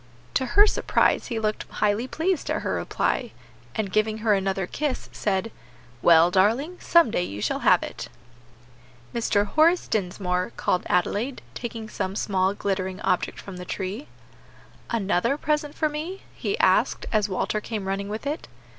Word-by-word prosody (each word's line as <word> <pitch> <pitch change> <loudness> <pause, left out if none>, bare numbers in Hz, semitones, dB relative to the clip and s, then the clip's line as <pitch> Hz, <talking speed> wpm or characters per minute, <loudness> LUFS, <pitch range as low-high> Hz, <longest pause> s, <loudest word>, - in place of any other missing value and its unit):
To 260 - +1
her 410 - +9
surprise - - +2
he 235 - -3
looked 215 -1 -2
highly 210 +4 0
pleased 335 +4 -1
at - - -1
her - - -1
reply, 240 - -1 0.4
and 205 -3 -2
giving 215 +2 +1
her 215 - +5
another 195 -1 0
kiss, 290 +7 -3
said, 205 +2 -1 0.5
"Well, 170 +1 +6
darling, 235 - +2
some 340 -9 +4
day - - +1
you 100 - -4
shall - - -1
have - - +4
it." - - -6 1.1
"Mr. 205 -3 +1
Horace 320 - +3
Dinsmore," 180 -2 -1
called 180 - 0
Adelaide, 205 +8 0
taking 230 -2 -5
some 195 -2 -3
small, 195 -2 +1
glittering 190 -2 -2
object 180 - 0
from 195 -2 -9
the 180 - -6
tree. 195 +9 -4 0.8
"Another 210 +3 +1
present 300 -1 -1
for 310 - +1
me?" 310 +6 -5
he 410 - -2
asked, - - +3
as 215 -2 +2
Walter 210 +3 -1
came 210 -3 -4
running 195 +1 -2
with 215 +5 -5
it. 295 +3 -3
210 Hz, 155 wpm, -25 LUFS, 190-270 Hz, 1.1 s, her